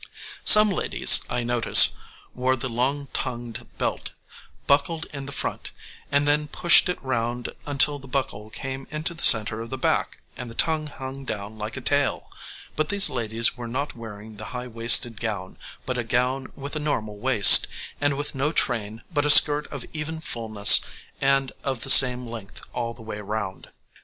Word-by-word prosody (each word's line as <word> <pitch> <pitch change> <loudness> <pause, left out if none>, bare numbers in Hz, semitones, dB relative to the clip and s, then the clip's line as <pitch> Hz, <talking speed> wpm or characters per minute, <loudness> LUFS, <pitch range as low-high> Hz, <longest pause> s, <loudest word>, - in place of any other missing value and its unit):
Some 210 -1 +7
ladies, 185 - +5
I 120 - -5
notice, 120 -1 +6 0.4
wore 130 +1 -2
the 130 +1 -7
long 135 +4 -4
tongued 120 -2 -8
belt - - -6 0.5
buckled 155 +3 -2
it - - -22
in 140 -1 -9
front, 140 - -6 0.4
and 145 +1 -1
then 150 +1 0
pushed 170 +4 +2
it 180 - -5
round 120 -1 -5 0.2
until 145 +1 +1
the 135 - -16
buckle 125 -5 -6
came 135 +3 -9
into 155 +3 -6
the 170 - -12
centre 110 0 +5
of 115 - -10
the 130 - -8
back - - -4
and 125 -1 -10
the 115 - -13
tongue 155 +1 -1
hung 135 -1 -10
down 110 -3 -9
like 110 +4 -8
a - - -8
tail; 140 +2 -3 0.4
but 155 0 -4
these 200 0 +3
ladies 115 -1 -3
were 120 -1 -10
not 135 +5 -6
wearing 110 -2 -13
the 110 - -10
high 125 - -8
waisted 115 -1 +2
gown, 100 -5 -7 0.3
but 125 -1 -5
a - - -4
gown 125 +3 -4
with 140 +2 -9
a - - -4
normal 110 -9 -6
waist, 110 -5 +7 0.3
and 145 -1 -2
with 145 +1 -5
no 140 +3 -3
train, 115 -7 -4
but 145 -1 -2
a - - -3
skirt 150 0 +6
of - - -10
even 160 +1 -7
fulness 110 -8 +4 0.4
and 135 -1 -1
of 135 -3 -6
the 135 - +2
same 125 -2 +7
length 115 -4 -12
all 115 0 -6
the 110 - -16
way 105 -1 -9
round. 100 -2 -8
125 Hz, 180 wpm, -21 LUFS, 115-145 Hz, 0.5 s, Some